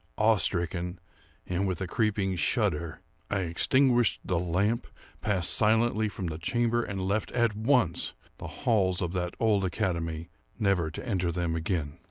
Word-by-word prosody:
Awe 110 Hz, 0 st, +4 dB
stricken, 90 Hz, -1 st, -1 dB, 0.5 s
and 95 Hz, +2 st, -1 dB
with 95 Hz, -3 st, -2 dB
a 95 Hz, -, -2 dB
creeping 100 Hz, -1 st, 0 dB
shudder, 80 Hz, 0 st, 0 dB, 0.3 s
I 100 Hz, -1 st, 0 dB
extinguished 120 Hz, +7 st, +3 dB
the 90 Hz, -2 st, 0 dB
lamp, 95 Hz, +7 st, 0 dB, 0.3 s
passed 95 Hz, -5 st, +2 dB
silently 110 Hz, 0 st, +2 dB
from 100 Hz, -2 st, -6 dB
the 80 Hz, -1 st, -4 dB
chamber, 120 Hz, +6 st, +1 dB
and 95 Hz, -4 st, -3 dB
left, 100 Hz, +2 st, -1 dB
at 120 Hz, -4 st, +2 dB
once, 110 Hz, -, +1 dB, 0.2 s
the -, -, -6 dB
halls 95 Hz, -7 st, +1 dB
of 90 Hz, 0 st, -3 dB
that 90 Hz, -1 st, -2 dB
old 105 Hz, -3 st, +2 dB
academy, 85 Hz, -4 st, -2 dB, 0.3 s
never 100 Hz, -7 st, +1 dB
to 80 Hz, -, -8 dB
enter 90 Hz, -6 st, 0 dB
them 85 Hz, -1 st, -1 dB
again. 80 Hz, -2 st, -2 dB
95 Hz, 155 wpm, -28 LUFS, 85-110 Hz, 0.5 s, Awe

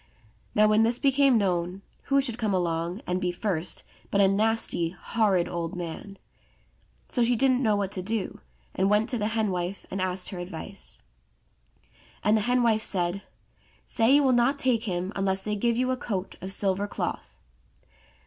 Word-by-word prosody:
Now 215 Hz, 0 st, +5 dB
when 215 Hz, +1 st, +4 dB
this 230 Hz, +2 st, +2 dB
became 275 Hz, -2 st, +4 dB
known, 185 Hz, -1 st, -1 dB, 0.2 s
who 275 Hz, 0 st, +3 dB
should 245 Hz, -3 st, -2 dB
come 215 Hz, -4 st, 0 dB
along 170 Hz, +2 st, -2 dB
and 180 Hz, +1 st, -1 dB
be 180 Hz, -, 0 dB
first 175 Hz, -3 st, -3 dB, 0.3 s
but 200 Hz, -, +1 dB
a 195 Hz, -, +6 dB
nasty, 210 Hz, -4 st, +1 dB
horrid, 190 Hz, 0 st, 0 dB
old 170 Hz, +1 st, -4 dB
man. 180 Hz, +3 st, -6 dB, 0.9 s
So 245 Hz, -, +1 dB
she 240 Hz, +1 st, +3 dB
didn't 255 Hz, +1 st, +3 dB
know 215 Hz, -5 st, +3 dB
what 200 Hz, -1 st, -1 dB
to 185 Hz, -, -2 dB
do, 215 Hz, +2 st, -3 dB, 0.3 s
and 190 Hz, +1 st, +1 dB
went 210 Hz, +3 st, +2 dB
to 245 Hz, -, 0 dB
the 210 Hz, -, 0 dB
hen 220 Hz, -2 st, 0 dB
wife 180 Hz, +2 st, -3 dB
and 195 Hz, -, -2 dB
asked 185 Hz, 0 st, 0 dB
her 185 Hz, -, -6 dB
advice. 160 Hz, -, -7 dB, 1.2 s
And 210 Hz, -, +4 dB
the 215 Hz, -, +2 dB
hen 245 Hz, +3 st, +2 dB
wife 220 Hz, -2 st, +3 dB
said, 180 Hz, -1 st, 0 dB, 0.6 s
*'Say 230 Hz, +4 st, +3 dB
you 290 Hz, -, +5 dB
will 265 Hz, -, +4 dB
not 245 Hz, +3 st, +3 dB
take 245 Hz, -4 st, +1 dB
him 185 Hz, 0 st, -2 dB
unless 195 Hz, -1 st, 0 dB
they 210 Hz, 0 st, -2 dB
give 235 Hz, +3 st, +1 dB
you 255 Hz, +1 st, +1 dB
a 255 Hz, -, -1 dB
coat 200 Hz, -6 st, -4 dB
of 190 Hz, -, -4 dB
silver 195 Hz, 0 st, 0 dB
cloth." -, -, -5 dB
205 Hz, 180 wpm, -27 LUFS, 185-230 Hz, 1.2 s, a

